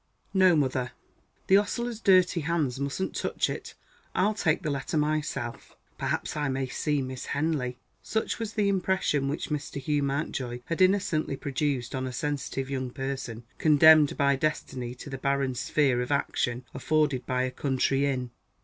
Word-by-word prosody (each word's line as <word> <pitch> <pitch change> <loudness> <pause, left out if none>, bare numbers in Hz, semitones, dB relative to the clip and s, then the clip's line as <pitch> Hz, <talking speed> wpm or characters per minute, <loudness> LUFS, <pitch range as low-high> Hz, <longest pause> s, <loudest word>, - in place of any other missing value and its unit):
"No, 185 -3 +5
mother. 130 -4 0 0.5
The 190 - +6
ostler's 235 +2 -3
dirty 185 -4 +4
hands 150 -5 -1
mustn't 140 +7 -2
touch - - 0
it - - -7 0.4
I'll 205 +4 +3
take 165 -6 +1
the 155 - -1
letter 140 +3 -2
myself. 150 -5 -2 0.2
Perhaps - - -2
I 145 -2 0
may 135 0 -1
see 145 +2 -1
Miss 130 0 -6
Henley." 140 -5 -1 0.2
Such 220 +1 -2
was 225 -1 -4
the 210 -3 +1
impression 190 -7 +1
which 145 - -3
Mr. 145 -2 -3
Hugh 145 +2 0
Mountjoy 135 -3 -2
had 165 +2 -2
innocently 185 -7 +2
produced 140 -3 -2
on 130 -1 -2
a - - -4
sensitive 140 -1 -2
young 130 -2 -3
person, 130 -3 -5 0.2
condemned 155 -1 +6
by 140 -1 +3
destiny 130 -4 -2
to 135 - -9
the 135 - -5
barren 140 -1 0
sphere 130 0 +1
of 125 - -3
action 125 -3 0
afforded 145 -1 0
by 130 0 +1
a 130 - -1
country 135 +1 +1
inn! 125 -3 -2
140 Hz, 160 wpm, -28 LUFS, 130-155 Hz, 0.5 s, The